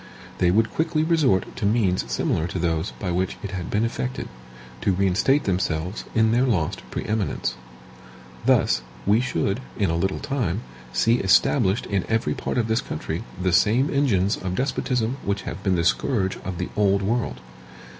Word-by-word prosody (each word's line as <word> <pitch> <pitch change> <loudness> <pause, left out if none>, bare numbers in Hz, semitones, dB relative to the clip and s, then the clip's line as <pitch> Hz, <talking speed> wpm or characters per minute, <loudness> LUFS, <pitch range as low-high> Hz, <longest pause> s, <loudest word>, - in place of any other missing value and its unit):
They 90 - +4
would 110 +5 +2
quickly 160 -1 +1
resort 155 - +2
to - - -2
means 100 -4 +1
similar 80 - 0
to 90 - -4
those 80 -2 0
by 95 -3 -3
which 90 +1 -1
it 100 - -4
had 90 -3 -4
been 105 +2 +1
effected, 125 +2 -3 0.5
to 100 - +2
reinstate 100 +10 +2
themselves 90 -1 -1
in 110 -1 +4
their 120 +2 +3
lost 85 -11 0
pre - - -4
eminence. 105 - -1 0.9
Thus, - - +3 0.2
we 105 +4 +4
should, 120 -4 -1 0.2
in 100 -6 +1
a - - 0
little 95 +3 0
time, 120 - -2 0.3
see 115 - +3
established 95 +2 +3
in 100 -3 -1
every 110 0 +1
part - - -3
of 115 -2 +1
this 110 +1 +1
country - - -4 0.2
the 90 -1 +1
same 120 +11 +3
engines 110 -8 +2
of 90 -1 -4
despotism 125 -1 -1
which 100 0 -2
have - - -6
been 95 -2 +1
the 85 - +1
scourge 95 +2 +1
of 95 -2 -4
the - - -3
Old 100 -1 +2
World. 100 - -1
100 Hz, 175 wpm, -24 LUFS, 90-120 Hz, 0.9 s, They